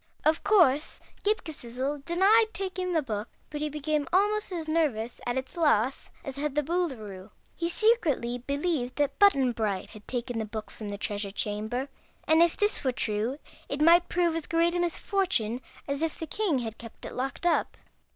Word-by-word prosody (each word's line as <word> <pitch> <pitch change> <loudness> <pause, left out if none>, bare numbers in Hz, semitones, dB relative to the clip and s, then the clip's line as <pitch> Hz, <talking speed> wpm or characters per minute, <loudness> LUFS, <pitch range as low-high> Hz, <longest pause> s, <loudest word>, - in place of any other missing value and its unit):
Of 315 +2 +3
course 335 -9 +4 0.2
Ghip 430 +2 +1
Ghisizzle 275 -1 -4
denied 400 +6 +5
taking 370 -1 -3
the 320 -2 +2
Book, 215 -3 -4 0.2
but 295 -1 -4
he 305 - 0
became 300 -1 -1
almost 415 +2 +2
as 330 -3 -3
nervous 280 -8 0
at 245 +1 0
its 260 0 -4
loss 270 -7 +2 0.2
as 275 0 -5
had 295 0 -2
the 300 - +2
Boolooroo. 245 - -3 0.3
He 335 0 -1
secretly 330 - +2
believed 280 -1 -1
that 280 -1 0
Button 275 -11 +5
Bright 210 -5 -2
had 210 -1 -13
taken 245 -2 -2
the 220 - -2
Book 215 0 -6
from 215 -2 -7
the 200 - -4
Treasure 205 0 -2
Chamber, 215 +6 -2 0.4
and 320 +1 +5
if 340 -1 +4
this 415 -5 +1
were 260 - +2
true 225 +2 -1 0.3
it 280 - -3
might 340 +3 +6
prove 345 -2 +1
as 330 - -3
great 335 0 +2
a 355 - 0
misfortune 345 - 0 0.3
as 280 +1 -2
if 325 -1 -1
the 320 - -4
king 370 -3 0
had 225 -3 -4
kept 230 -1 -10
it - - -6
locked 270 +6 -4
up. 345 - +1
290 Hz, 185 wpm, -28 LUFS, 240-345 Hz, 0.4 s, might